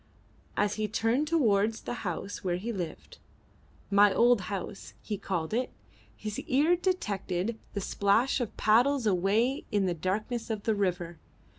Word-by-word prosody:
As 205 0 +1
he 215 - +1
turned 230 +7 +1
towards 225 -9 +2
the - - -4
house 195 +1 -4
where 180 -2 0
he 230 +6 -4
lived 175 -6 -6 0.7
"my 200 0 +6
old 235 +1 +4
house" 195 +1 -6
he 210 - -3
called 185 -3 -3
it 250 +2 0 0.5
his 215 -1 -5
ear 300 +7 +3
detected 220 - -2 0.2
the 200 - -1
splash 205 +8 +2
of 235 - -4
paddles 245 +4 +3
away 210 - +2
in 205 -3 +2
the 180 - +1
darkness 210 +8 -2
of 215 -2 -3
the 220 - +2
river. 175 -4 -2
210 Hz, 150 wpm, -29 LUFS, 195-235 Hz, 0.7 s, my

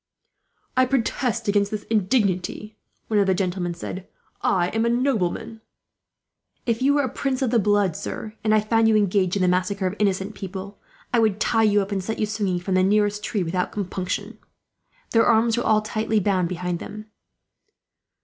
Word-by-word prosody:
"I 255 0 +4
protest 240 -2 -1
against 205 0 +2
this 210 -1 -4
indignity," 210 -1 0 0.3
one 215 -2 +2
of 200 - +3
the 190 - +3
gentlemen 180 -2 -2
said. 185 +2 -7 0.3
"I 180 -2 +2
am 225 0 0
a 235 - +2
nobleman." 230 -3 -1 1.0
"If 230 0 0
you 280 +2 +3
were 285 - +3
a - - 0
prince 265 +1 -2
of 245 - 0
the 235 - +4
blood, 205 -4 +2
sir, 215 - -6
and 215 - +2
I 215 0 +4
found 225 +1 +2
you 220 - +4
engaged 195 -3 +2
in 195 - +1
the - - +3
massacre 185 +2 0
of 185 +2 -1
innocent 195 0 0
people, 195 0 -7 0.3
I 240 - +4
would 215 -3 +2
tie 225 0 +2
you 205 -2 +4
up, 195 - -9
and 195 -2 -1
set 220 +4 -3
you 215 - +1
swinging 210 -4 -1
from 185 +2 -3
the 185 - +4
nearest 205 +1 +2
tree, 205 -4 -1
without 180 +2 -2
compunction." 185 -2 -4 0.7
Their 225 -1 +4
arms 225 0 +4
were 240 - -2
all 215 0 +3
tightly 220 0 0
bound 185 -3 +1
behind 180 -1 -3
them. 215 +3 -8
210 Hz, 190 wpm, -23 LUFS, 185-225 Hz, 1.0 s, I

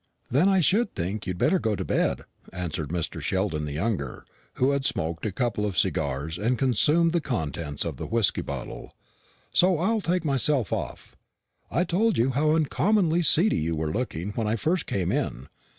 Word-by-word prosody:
"Then 150 +10 +4
I 190 -2 +4
should 205 +7 +2
think 95 +5 -3
you'd 90 -1 -2
better 190 - +3
go 110 -6 0
to - - -4
bed," - - 0 0.3
answered 85 -5 -4
Mr. 85 -1 -3
Sheldon 95 -6 -1
the 75 - -5
younger, 80 - -3 0.3
who 130 +2 +2
had 140 -1 0
smoked 85 -5 -1
a - - -2
couple 115 -1 -1
of 100 -4 -2
cigars, 75 +6 -1
and 120 +4 +1
consumed 150 +7 +3
the 170 - +2
contents 80 - -3
of - - -4
the - - -5
whisky 115 -3 +1
bottle; 70 -3 -7 0.6
"so 180 -1 +4
I'll 215 +7 +1
take 180 -1 0
myself 135 - +1
off. - - -5 0.5
I 175 - +1
told 195 +5 +1
you 125 +4 +2
how 150 +4 +2
uncommonly 175 +2 +2
seedy 175 +5 +4
you 80 +1 -1
were 75 0 -2
looking 105 -5 -3
when 110 +1 -2
I 110 - +1
first 165 - -1
came 95 -3 -1
in. 65 +3 -2
115 Hz, 180 wpm, -26 LUFS, -, 0.6 s, Then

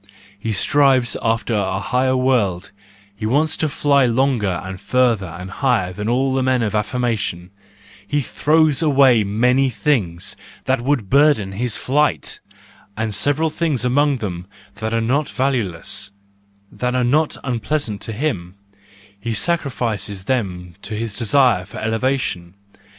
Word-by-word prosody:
He 110 +3 -3
strives 130 +2 +3
after 115 0 0
a 95 -3 0
higher 130 +7 +1
world, 105 -8 +1 0.4
he 110 +1 -3
wants 150 +6 +2
to 155 - 0
fly 140 -2 +3
longer 115 -7 +1
and 95 -1 -7
further 120 -6 +1
and 90 +3 -8
higher 115 -8 0
than 105 +4 -3
all 130 +2 +1
men 130 -2 +1
of 110 - -1
affirmation—he 100 0 -3
throws 155 +2 +2
away 135 -7 +5
many 125 +6 +2
things 100 - -1 0.3
that 130 -2 +1
would 130 -5 0
burden 140 -8 +4
his 115 +3 -2
flight, 150 +3 0 0.6
and 110 -1 -2
several 145 +9 +1
things 150 -8 -1
among 140 +2 +2
them 90 -6 -5 0.3
that 110 +2 -3
are 115 0 +1
not 140 +6 0
valueless, 105 -7 -2 0.6
that 125 0 -2
are 125 - +2
not 150 +6 +2
unpleasant 125 -2 -2
to - - -4
him: 105 - -3 0.6
he 115 +2 -3
sacrifices 110 - -2
them 95 -7 -2
to 110 - -4
his 110 -1 -3
desire 120 -3 +3
for 100 - -11
elevation. 110 -6 -2
120 Hz, 135 wpm, -20 LUFS, 100-135 Hz, 0.6 s, away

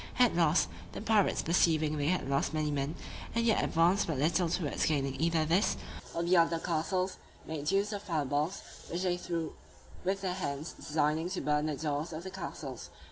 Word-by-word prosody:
At 245 -2 +5
last, 165 -1 +4 0.3
the - - -5
pirates 215 -2 +3
perceiving 155 -2 +3
they 145 -1 0
had 180 -2 +1
lost 140 +3 0
many 155 -1 0
men, 140 +2 -1 0.4
and 230 0 +2
yet 225 - +3
advanced 175 +5 +3
but 160 -5 -1
little 165 +5 +2
towards 165 -3 0
gaining 140 -3 0
either 165 -1 +2
this, 175 +7 +2 0.4
or 170 - 0
the 175 +1 +4
other 165 0 +4
castles, 180 +3 -1 0.3
made 150 -2 -3
use 200 +3 +1
of 205 - -4
fire 165 -8 -1
balls, 145 +7 -1 0.3
which 175 +2 -2
they 180 -1 +2
threw 170 -2 -3 0.5
with 190 +1 0
their 185 -2 -1
hands, 155 -4 -4
designing 155 +2 0
to 185 - -3
burn 150 +1 +1
the 150 - -1
doors 155 +2 -2
of 160 +2 -5
the 190 - -6
castles. 145 -8 -6
165 Hz, 190 wpm, -31 LUFS, 150-185 Hz, 0.5 s, At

